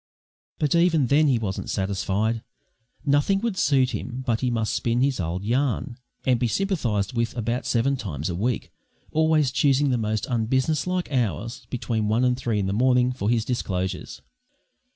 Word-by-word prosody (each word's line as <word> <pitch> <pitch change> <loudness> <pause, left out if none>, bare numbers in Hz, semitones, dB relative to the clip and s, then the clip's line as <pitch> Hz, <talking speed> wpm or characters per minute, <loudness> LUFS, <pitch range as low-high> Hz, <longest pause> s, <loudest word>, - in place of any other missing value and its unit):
But 150 -3 +1
even 170 -4 +4
then 150 +5 +4
he 130 -4 +3
wasn't 100 -4 -4
satisfied. 100 +3 -1 0.6
Nothing 145 +7 +3
would 230 -4 -1
suit 135 -8 +2
him 130 +1 -5
but 115 -4 0
he 130 - +1
must 115 -2 -1
spin 120 +1 0
his 135 -3 +1
old 90 +2 -2
yarn, 125 +1 0 0.3
and 125 -2 +3
be 120 - +1
sympathised 120 - -1
with 115 0 -1
about 120 +2 -2
seven 130 +4 +2
times 80 - -4
a 90 - -2
week, 110 +7 -2 0.4
always 155 -3 +3
choosing 140 +1 +3
the 125 - +1
most 110 -2 -1
unbusinesslike 135 +9 0
hours 120 -1 -2
(between 115 -3 -1
one 115 +4 +2
and 125 0 +3
three 120 -3 -2
in 100 - 0
the 95 - -1
morning) 125 +2 +3
for 110 -5 -2
his 115 -2 +1
disclosures. 95 -7 -3
125 Hz, 170 wpm, -24 LUFS, 110-140 Hz, 0.6 s, even